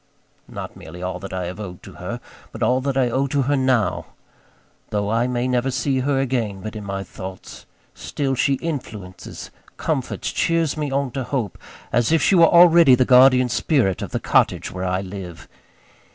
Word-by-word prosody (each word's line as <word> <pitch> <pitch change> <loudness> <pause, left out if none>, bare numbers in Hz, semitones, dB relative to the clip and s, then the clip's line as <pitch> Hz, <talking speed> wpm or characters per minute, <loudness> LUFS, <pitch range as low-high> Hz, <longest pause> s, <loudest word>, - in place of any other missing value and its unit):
Not - - -8
merely 90 +3 -10
all 90 0 -3
that 95 - -8
I 90 -1 -3
have 90 +4 -7
owed 90 -4 -8
to - - -11
her; - - -5 0.3
but - - -4
all 130 +1 +2
that 135 0 -2
I 125 -3 +2
owe 135 +3 +1
to 140 0 0
her 145 +3 +1
now. 130 -4 +1 0.8
Though 105 0 -1
I 115 +2 +1
may 125 0 -1
never 125 +1 0
see 135 +1 0
her 135 +1 0
again, 120 -7 -2
but 110 +2 -7
in 105 - -6
my 100 -1 -4
thoughts; 95 0 -10 0.3
still 140 -2 -3
she 135 +2 +2
influences, 110 - -7 0.3
comforts, - - -2
cheers 165 -3 0
me 150 -2 -2
on 135 -1 -1
to 135 +2 -3
hope, 120 -5 -3 0.3
as 120 +2 +2
if 165 - +4
she 175 - +2
were 170 -3 +7
already 170 -5 +7
the 130 0 +2
guardian 125 0 +6
spirit 120 - +1
of - - -4
the - - -2
cottage - - +1
where 90 +1 -4
I 90 +1 0
live. 90 -4 -8
125 Hz, 190 wpm, -21 LUFS, 100-135 Hz, 0.8 s, were